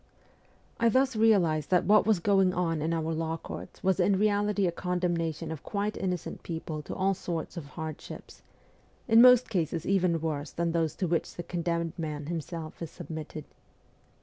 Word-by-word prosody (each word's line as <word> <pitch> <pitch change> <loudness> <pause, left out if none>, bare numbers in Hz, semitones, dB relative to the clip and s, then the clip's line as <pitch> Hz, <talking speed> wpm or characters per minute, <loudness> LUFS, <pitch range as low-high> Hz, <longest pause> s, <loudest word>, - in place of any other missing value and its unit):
I 235 0 +4
thus 260 +2 +2
realized 180 -9 +3
that 180 -1 +3
what 210 +1 +5
was 220 -3 +4
going 195 0 +3
on 165 -3 0
in 160 +2 0
our 165 0 -1
law 160 0 -2
courts - - -9
was 190 -1 +2
in 200 -1 +3
reality 205 -1 +2
a 175 - +1
con 180 +1 -2
demnation 165 -2 -1
of 160 - -6
quite 205 +1 -2
innocent 180 -2 -3
people 160 -2 -5
to - - -7
all 195 +1 +2
sorts 170 -3 -4
of 170 -4 -6
hard 160 0 -6
ships, - - -11 0.7
in 225 0 +7
most 250 0 +7
cases 165 -3 -1
even 180 -4 +2
worse 150 -2 -3
than 170 0 -1
those 165 -2 0
to 185 - -1
which 165 0 -1
the 175 - -5
condemned 170 -2 -2
man 150 -2 -4
himself 165 0 -5
is 165 - -4
submitted. 155 -2 -7
170 Hz, 180 wpm, -29 LUFS, 160-195 Hz, 0.7 s, in